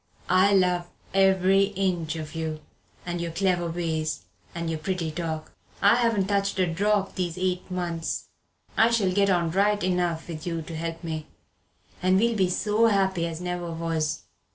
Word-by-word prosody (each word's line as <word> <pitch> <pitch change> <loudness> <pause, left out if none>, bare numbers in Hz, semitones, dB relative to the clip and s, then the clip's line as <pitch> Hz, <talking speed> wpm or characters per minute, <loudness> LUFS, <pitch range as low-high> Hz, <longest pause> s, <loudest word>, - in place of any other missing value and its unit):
I 185 +2 +5
love 180 -2 +2 0.2
every 195 0 +4
inch 175 -4 0
of 155 -1 -6
you, 160 -1 -3 0.4
and 175 -1 -3
your 170 - -2
clever 175 -1 +1
ways, 160 -2 -2 0.3
and 170 0 -3
your 160 -1 -2
pretty 170 -1 -2
talk. 160 -1 -4 0.3
I 205 +4 +5
haven't 230 -5 +2
touched 200 0 0
a 185 - +3
drop 195 +4 +1
these 175 -2 -3
eight 185 0 -1
months 175 -3 -3 0.5
I 225 - +5
shall 215 -5 +2
get 200 +1 +3
on 170 -3 +2
right 205 +3 +2
enough 180 -3 0
with 165 -1 -6
you 165 -2 -2
to 165 +1 -7
help 165 +1 -4
me 160 -2 -4 0.7
and 185 +1 +4
we'll 230 +3 +2
be 190 -3 +2
so 210 +4 +2
happy 190 -5 +2
as 165 -1 -5
never 180 -1 -3
was. 165 -2 -2
180 Hz, 170 wpm, -26 LUFS, 165-195 Hz, 0.7 s, I